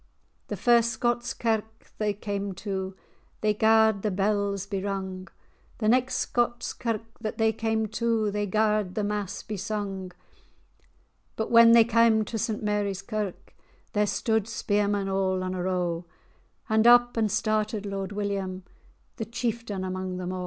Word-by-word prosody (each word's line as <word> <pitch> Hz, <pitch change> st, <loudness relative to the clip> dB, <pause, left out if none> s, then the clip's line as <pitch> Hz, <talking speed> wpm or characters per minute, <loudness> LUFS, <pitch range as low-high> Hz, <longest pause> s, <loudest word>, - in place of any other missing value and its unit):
The -, -, -4 dB
first 235 Hz, -1 st, +4 dB
Scots 240 Hz, +1 st, -1 dB
kirk 225 Hz, -2 st, +1 dB, 0.2 s
that -, -, -27 dB
they 210 Hz, -1 st, +1 dB
cam 200 Hz, -1 st, -4 dB
to, 190 Hz, 0 st, -4 dB, 0.5 s
They 215 Hz, 0 st, +2 dB
garred 220 Hz, -1 st, +4 dB
the 215 Hz, -, 0 dB
bells 200 Hz, 0 st, 0 dB
be 200 Hz, -1 st, -3 dB
rung; 190 Hz, -1 st, -4 dB, 0.5 s
The 215 Hz, -, -1 dB
next 255 Hz, +3 st, +3 dB
Scots 240 Hz, 0 st, -1 dB
kirk 230 Hz, -2 st, -2 dB, 0.2 s
that 220 Hz, -2 st, -4 dB
they 220 Hz, 0 st, +3 dB
cam 220 Hz, 0 st, 0 dB
to, 225 Hz, -1 st, 0 dB
They 205 Hz, 0 st, -1 dB
garred 210 Hz, -2 st, +1 dB
fhe 210 Hz, -, 0 dB
mass 205 Hz, -2 st, -3 dB
be 215 Hz, -, -5 dB
sung. 195 Hz, -2 st, -4 dB, 1.2 s
But 220 Hz, -, -3 dB
when 230 Hz, 0 st, +8 dB
they 230 Hz, -1 st, +8 dB
cam 225 Hz, -1 st, +3 dB
to 225 Hz, -, -4 dB
St 215 Hz, 0 st, -2 dB
Mary's 205 Hz, -2 st, -1 dB
Kirk, 210 Hz, -3 st, -5 dB, 0.4 s
There 210 Hz, 0 st, +2 dB
stude 220 Hz, 0 st, 0 dB
spearmen 205 Hz, -2 st, 0 dB
all 190 Hz, -1 st, 0 dB
on 185 Hz, 0 st, -3 dB
a 185 Hz, -, -3 dB
row; 175 Hz, -2 st, -1 dB, 0.6 s
And 220 Hz, +1 st, +3 dB
up 240 Hz, 0 st, +6 dB
and 220 Hz, -3 st, +1 dB
started 215 Hz, 0 st, 0 dB
Lord 195 Hz, -1 st, -4 dB
William, 195 Hz, -2 st, -3 dB, 0.5 s
The 225 Hz, -, -3 dB
chieftaine 230 Hz, -3 st, -3 dB
amang 185 Hz, 0 st, -4 dB
them 180 Hz, 0 st, -4 dB
a'. 185 Hz, -, -4 dB
210 Hz, 160 wpm, -27 LUFS, 195-225 Hz, 1.2 s, when